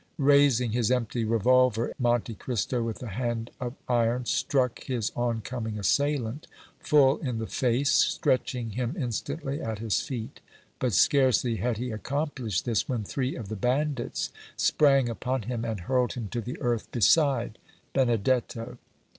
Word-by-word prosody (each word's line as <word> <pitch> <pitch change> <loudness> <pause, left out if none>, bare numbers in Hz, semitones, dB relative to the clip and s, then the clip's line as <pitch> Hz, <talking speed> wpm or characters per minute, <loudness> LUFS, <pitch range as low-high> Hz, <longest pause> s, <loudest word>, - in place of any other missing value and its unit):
Raising 140 -4 +4
his 120 0 +1
empty 120 -2 0
revolver, 115 +1 +3
Monte 120 -2 +1
Cristo 120 +2 -2
with 115 +1 -4
a 120 - -5
hand 120 +1 -3
of 125 0 -4
iron 120 0 +1
struck 130 -2 0
his 120 -5 -2
on 120 -2 -1
coming 110 -2 -4
assailant 135 - 0 0.3
full 140 -2 +4
in 125 -6 -3
the 110 - -3
face, 125 +4 +1
stretching 125 -2 +1
him 125 - -2
instantly 140 - -3
at 110 -1 -3
his 110 -1 0
feet; 120 -6 -6 0.4
but 125 -4 0
scarcely 125 - +3
had 120 -1 -1
he 125 +1 -3
accomplished 130 - -2
this 115 -4 0
when 120 -4 -1
three 130 +5 -2
of 115 -6 -6
the 110 - -4
bandits 130 +4 -1 0.3
sprang 135 -4 +4
upon 125 +1 -2
him 115 +1 -3
and 110 -5 -3
hurled 125 +5 +1
him 115 -5 -5
to 120 +2 -3
the 125 +3 -6
earth 120 -2 -1
beside 125 -2 +3 0.3
Benedetto. 120 -1 0
120 Hz, 150 wpm, -27 LUFS, 115-130 Hz, 0.4 s, Raising